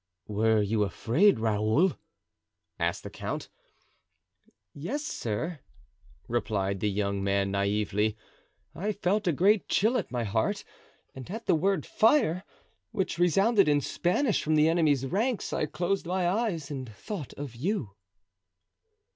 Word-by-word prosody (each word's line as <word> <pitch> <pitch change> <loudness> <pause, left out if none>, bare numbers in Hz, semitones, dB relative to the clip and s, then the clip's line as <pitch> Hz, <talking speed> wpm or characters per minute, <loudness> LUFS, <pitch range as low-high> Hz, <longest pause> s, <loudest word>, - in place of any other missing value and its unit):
"Were 110 +1 +2
you 105 +1 0
afraid, 120 - +3
Raoul?" 110 - +2 0.8
asked - - -1
the - - -7
count. - - -5 1.2
"Yes, 290 +1 -4
sir," 155 - -3 0.7
replied 100 -5 -1
the 105 - 0
young 100 -1 -1
man 100 0 +1
naively; 105 +1 0 0.6
"I 210 +5 -2
felt 200 +1 0
a - - +4
great 195 +7 +3
chill 230 +5 +3
at - - -5
my 120 -2 -1
heart, 110 +1 -1 0.5
and 130 +3 -9
at 225 +4 -6
the - - +3
word 180 0 +1
'fire,' 220 - +3 0.5
which 190 -5 -2
resounded 195 +4 +4
in 145 -1 +4
Spanish 190 - 0
from 155 0 +1
the 155 0 +5
enemy's 155 -5 +2
ranks, 220 - -1
I 150 - 0
closed 180 +4 -2
my 180 0 0
eyes 180 -7 -1
and 130 -4 -5
thought 165 - -7
of 140 -5 -7
you." 150 - -2
155 Hz, 135 wpm, -28 LUFS, -, 1.2 s, the